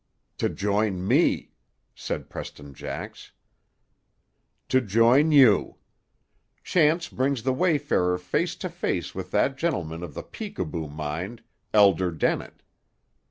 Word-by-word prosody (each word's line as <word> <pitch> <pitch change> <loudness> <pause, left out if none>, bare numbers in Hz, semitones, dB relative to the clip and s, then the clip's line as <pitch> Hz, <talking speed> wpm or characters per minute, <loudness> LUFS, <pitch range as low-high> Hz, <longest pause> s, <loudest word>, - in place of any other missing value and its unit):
"To - - +1
join 100 -2 -1
me," - - +2 0.4
said - - -5
Preston 70 -1 -9
Jax. - - -8 1.4
"To 130 - +4
join 120 +8 +4
you. 130 -9 +5 0.9
Chance 165 0 +2
brings 130 -2 -1
the 130 0 +1
wayfarer 145 - +1
face 150 - -1
to 185 - -5
face 130 - -3
with 95 -1 -6
that 135 +7 +1
gentleman 85 - -2
of 85 -5 -8
the - - -5
peekaboo 80 -1 -5
mind, 80 +9 -5 0.3
Elder 95 -4 +4
Dennett. 80 -3 -2
105 Hz, 115 wpm, -25 LUFS, 90-140 Hz, 1.4 s, you